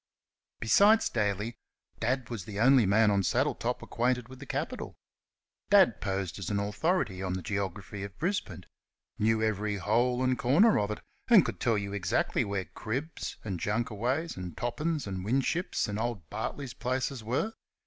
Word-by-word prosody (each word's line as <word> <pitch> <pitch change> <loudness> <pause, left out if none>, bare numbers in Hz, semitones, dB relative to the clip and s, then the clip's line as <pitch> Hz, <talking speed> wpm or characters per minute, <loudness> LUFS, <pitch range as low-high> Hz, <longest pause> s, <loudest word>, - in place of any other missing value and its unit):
Besides 205 - +5
Daly, 105 +1 -1 0.4
Dad 125 +1 -1
was 105 -7 -5
the 105 -1 -6
only 125 -2 +6
man 105 +2 +4
on 100 -1 +3
Saddletop 95 - 0
acquainted 125 0 0
with 130 0 -11
the 140 - -10
capital. - - -4 0.7
Dad - - +5
posed 95 -1 -2
as 95 - -4
an 100 -1 0
authority 105 - 0
on 95 -1 -2
the 95 -1 -4
geography 100 0 -4
of 100 -1 -7
Brisbane 185 +4 -2 0.5
knew 110 +1 +2
every 105 -1 0
hole 120 +6 +1
and 130 -1 +1
corner 170 - +5
of 105 - 0
it, 105 - -4 0.3
and 225 -8 +7
could 105 -6 -4
tell 115 -3 +2
you 100 -1 -3
exactly 95 -4 +1
where 100 -2 -2
Cribb's, 135 +8 -5
and 95 -5 -4
Junkaway's, 120 - -1
and 90 -1 -7
Toppin's, 150 +6 -1
and 95 -2 -4
Winship's, 135 - 0
and 105 0 -3
old 110 -8 -3
Bartley's 140 -4 -4
places 130 -1 -2
were. 130 - -1
110 Hz, 160 wpm, -30 LUFS, 100-130 Hz, 0.7 s, and